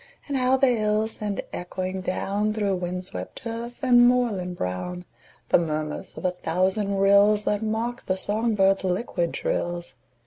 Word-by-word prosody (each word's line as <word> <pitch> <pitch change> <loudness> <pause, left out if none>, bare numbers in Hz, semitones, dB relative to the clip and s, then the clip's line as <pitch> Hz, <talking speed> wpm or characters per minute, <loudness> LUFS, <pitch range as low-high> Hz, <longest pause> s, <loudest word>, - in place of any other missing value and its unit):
And 285 - -2
how 255 0 +3
the 270 - +4
hills 220 -3 +1
send 210 -2 -3
echoing 185 +1 -4
down, 200 +3 -1
Through 200 -3 0
wind 180 +1 -4
swept 90 - -7
turf 235 +2 -6
and 245 -2 +6
moorland 210 -8 +1
brown, 175 - -4 0.4
The - - +5
murmurs 155 -2 -3
of - - -6
a 180 - +3
thousand 185 +4 0
rills 200 +2 +5
That 210 0 0
mock 225 +3 -2
the 185 - +1
song 220 +3 0
birds' 195 -1 +3
liquid 180 -2 -1
trills! 175 -4 -2
200 Hz, 160 wpm, -25 LUFS, 180-225 Hz, 0.4 s, and